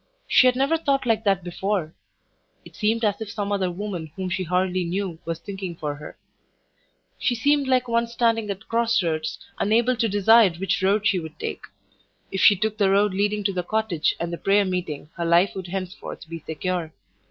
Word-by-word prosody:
She 255 - +6
had 250 - +3
never 275 +5 +2
thought 275 -4 0
like 225 -2 +1
that 195 -3 +2
before; 180 -2 -2 0.7
it - - -14
seemed 225 +2 +1
as 210 +1 0
if 220 - -5
some 205 -1 -3
other 195 -3 0
woman 180 -4 -5
whom 185 -1 -4
she 185 - -1
hardly 180 +1 0
knew 175 -1 -3
was 165 -1 -3
thinking 190 0 -6
for 150 -3 -3
her. 150 +1 -10 1.0
She 245 - +1
seemed 285 +3 +2
like 255 -1 +2
one 235 0 +1
standing 230 -2 0
at 200 +2 -5
cross 230 -3 +2
roads, 160 -1 -2 0.2
unable 235 +4 +2
to 230 -1 +1
decide 205 -2 +5
which 190 +1 -1
road 200 +2 +2
she 200 -4 +3
would 160 -2 -9
take. - - -4 0.7
If 190 - -2
she 205 - +7
took 215 +3 -2
the 200 -2 +4
road 200 0 +3
leading 205 +2 0
to 195 0 0
the 180 - -1
cottage 205 -4 0
and 170 0 -3
the 170 - -5
prayer 200 +1 +3
meeting 175 -5 -4
her 170 - -2
life 170 +4 +4
would 190 -2 -6
henceforth 185 -1 -6
be 165 0 -6
secure. 160 +1 -3
195 Hz, 200 wpm, -24 LUFS, 175-220 Hz, 1.0 s, she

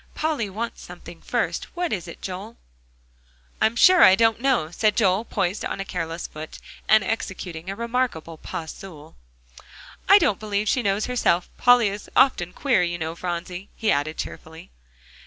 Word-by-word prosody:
"Polly 300 -9 -1
wants 225 +4 -5
something, - - -11
first; - - -2
what 350 -1 -1
is 180 -4 -4
it, 170 - -11
Joel?" 195 +5 -7 1.0
"I'm 220 - +3
sure 365 +8 +6
I 185 - +8
don't 225 +1 +2
know," 245 - +1
said 210 +4 +1
Joel, 195 -1 +2
poised 190 -2 -2
on - - -4
a 195 - -3
careless 165 -2 -4
foot, 155 +1 -9 0.3
and 215 -1 +6
executing 185 -6 -4
a 195 - -4
remarkable 235 -8 -2
pas 160 +1 -6
seul. 160 -5 -12 0.9
"I 400 - +10
don't 280 - +1
believe 210 -1 -2
she 250 - +2
knows 200 -1 0
herself. 235 -8 +1
Polly 245 -3 +5
is 205 +1 -8
often 180 -10 +3
queer, 265 +6 +1
you 175 -1 -1
know, 160 -1 -4
Phronsie," 180 +2 -5
he 220 - 0
added 145 +3 -1
cheerfully. 160 - -8
195 Hz, 165 wpm, -23 LUFS, 170-230 Hz, 1.0 s, I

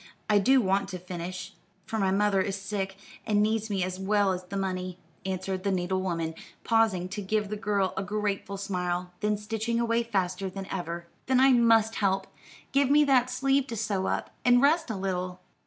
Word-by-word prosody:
I 210 -1 +4
do 260 +6 +5
want 195 -1 +1
to 185 - -4
finish, 180 +1 -6 0.3
for 220 - -3
my 195 -2 +2
mother 200 0 +2
is 195 0 -1
sick, 195 -1 -3 0.3
and 210 -1 +1
needs 220 0 0
me 195 -3 0
as 185 0 -4
well 200 0 +2
as 180 0 -4
the 195 +2 -5
money," 185 -2 -3 0.3
answered 190 0 -3
the 200 - +1
needle 185 0 0
woman, 165 -3 -2 0.3
pausing 220 -6 +2
to 205 +2 -4
give 210 +1 -1
the 210 - -2
girl 205 -2 0
a - - -1
grateful 200 0 -2
smile, 180 -2 -2
then 210 0 +1
stitching 225 +2 -2
away 235 0 +2
faster 190 -4 -1
than 195 +1 -6
ever. 170 -2 -4 0.2
"Then 260 -1 +4
I 265 0 +6
must 225 -2 +4
help. 195 -1 +1 0.5
Give 275 -1 +3
me 295 +1 +6
that 255 -3 +3
sleeve 270 +1 +1
to 235 - -5
sew 205 -3 -1
up, - - -2
and 245 0 +6
rest 305 +3 +3
a 220 - -2
little. 185 -1 -3
200 Hz, 195 wpm, -28 LUFS, 185-225 Hz, 0.5 s, I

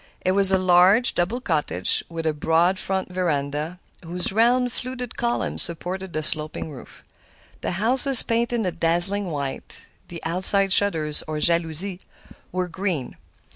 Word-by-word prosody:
It 185 - 0
was 195 0 +5
a 190 - +3
large, 185 +5 +3
double 185 +8 -2
cottage, 150 - 0
with 165 -1 -7
a 160 - 0
broad 165 +5 0
front 190 -1 -3
veranda, 155 -1 -3 0.2
whose 175 +2 +1
round, 245 +3 +1
fluted 250 -1 -7
columns 240 0 -1
supported 180 +2 -3
the 155 -1 -4
sloping 155 +1 -4
roof. 135 - -14 0.6
The - - -4
house 240 +9 0
was 270 -3 +8
painted 235 -1 -2
a 180 - -2
dazzling 175 +5 0
white; 140 -5 -7 0.2
the 170 - -9
outside 190 +3 +5
shutters, 160 -8 +1
or 155 0 -5
jalousies, 170 +3 +1 0.5
were 185 0 -3
green. 175 -6 -5
180 Hz, 145 wpm, -22 LUFS, 160-200 Hz, 0.6 s, was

